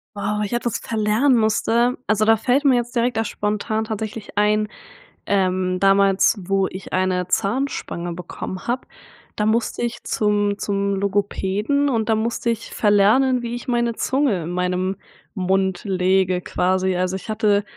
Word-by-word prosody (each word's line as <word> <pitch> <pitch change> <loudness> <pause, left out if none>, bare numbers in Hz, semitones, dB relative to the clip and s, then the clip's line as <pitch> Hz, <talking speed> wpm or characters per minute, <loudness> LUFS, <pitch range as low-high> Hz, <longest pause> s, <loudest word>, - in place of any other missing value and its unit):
Wow, 210 +1 -2
ich 205 - -4
etwas 240 -1 -1
verlernen 225 +4 +2
musste. 230 +3 +2
Also 215 0 +2
da 225 0 +5
fällt 260 +6 +1
mir 260 -2 +5
jetzt 240 +1 -2
direkt 235 -1 +1
da 225 - +2
spontan 215 +1 -2
tatsächlich 215 -1 -6
ein, 210 +1 +2 0.6
ähm, 185 -2 +1
damals 195 +1 +4
wo 195 -1 +2
ich 185 0 -9
eine 185 -1 0
Zahnspange 195 -5 -2
bekommen 180 +2 -7
habe, 250 +2 -2 0.5
da 210 - 0
musste 225 +2 0
ich 235 0 -4
zum 205 -1 0
zum 200 -1 -1
Logopäden 205 +7 0
und 230 -4 -1
da 220 - +4
musste 230 +1 -1
ich 230 0 -5
verlernen, 220 +5 +3
wie 235 - -4
ich 240 - -8
meine 235 -1 +1
Zunge 260 - 0
in 165 - -5
meinem 180 +1 -1 0.4
Mund 190 +1 0
lege 185 -1 +1
quasi. 185 +1 0
Also, 185 +1 -1
ich 190 +4 -8
hatte, 210 -2 +2
210 Hz, 155 wpm, -21 LUFS, 190-230 Hz, 0.6 s, da